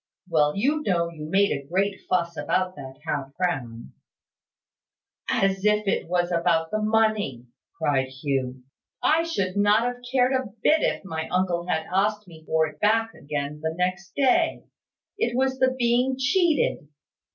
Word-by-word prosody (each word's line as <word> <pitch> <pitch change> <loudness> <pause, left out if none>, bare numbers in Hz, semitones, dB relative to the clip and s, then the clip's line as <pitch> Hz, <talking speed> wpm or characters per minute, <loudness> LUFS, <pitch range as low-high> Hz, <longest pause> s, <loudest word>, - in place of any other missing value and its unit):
"Well, 150 -4 +2
you 290 +9 +1
know 170 - 0
you 155 -2 -8
made 200 +3 +3
a 140 - -2
great 195 +4 0
fuss 170 -2 0
about 180 +5 -1
that 135 -2 -9
half 140 -3 -3
crown." 125 -11 -3 1.4
"As 195 0 +1
if 210 0 +2
it 195 - 0
was 175 0 0
about 165 -1 +1
the 215 - -1
money!" 215 - +1 0.3
cried 140 -4 +1
Hugh. 130 -1 -3 0.4
"I 320 +2 +4
should 200 - -2
not 205 +2 +4
have 245 0 -3
cared 255 0 +3
a 260 0 0 0.2
bit 315 +1 +4
if - - -1
my 160 -3 -4
uncle 180 -1 0
had 160 -2 -1
asked 210 +1 +1
me 160 -2 -14
for 160 0 +2
it 150 - -9
back 225 +2 +2
again 145 +1 -5
the 160 0 -2
next 180 +1 -2
day. 290 +5 +2 0.6
It 425 - 0
was 265 0 +1
the 260 0 +3
being 245 +2 +2
cheated. 295 - +1
185 Hz, 160 wpm, -25 LUFS, 160-225 Hz, 1.4 s, I